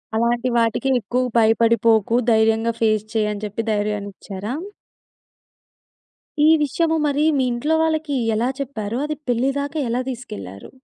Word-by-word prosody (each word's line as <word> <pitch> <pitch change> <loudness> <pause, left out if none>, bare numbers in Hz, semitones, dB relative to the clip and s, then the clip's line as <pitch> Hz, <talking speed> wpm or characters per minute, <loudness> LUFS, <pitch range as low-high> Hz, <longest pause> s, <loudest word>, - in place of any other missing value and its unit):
అలాంటి 235 +2 +1
వాటికి 230 +3 +1
ఎక్కువ 245 +4 -1
భయపడిపోకు, 225 0 +3 0.2
ధైర్యంగా 225 +1 +2
ఫేస్ 215 -1 +2
చెయ్యని 210 -1 -1
చెప్పి 210 +2 -3
ధైర్యాన్నిచ్చారా? 205 0 -4 1.9
ఈ - - +6
విషయము 320 +3 +1
మరీ 290 +1 +1
మీ 265 - +2
ఇంట్లో 290 +7 0
వాళ్ళకి 315 -2 -1 0.2
ఎలా 235 +4 0
చెప్పారు? 235 -5 -4
అది 305 0 -4
పెళ్లిదాకా 275 +5 -1
ఎలా 245 +2 0
తీసికెళ్లారు? 100 - -8
230 Hz, 115 wpm, -21 LUFS, 215-270 Hz, 1.9 s, ఈ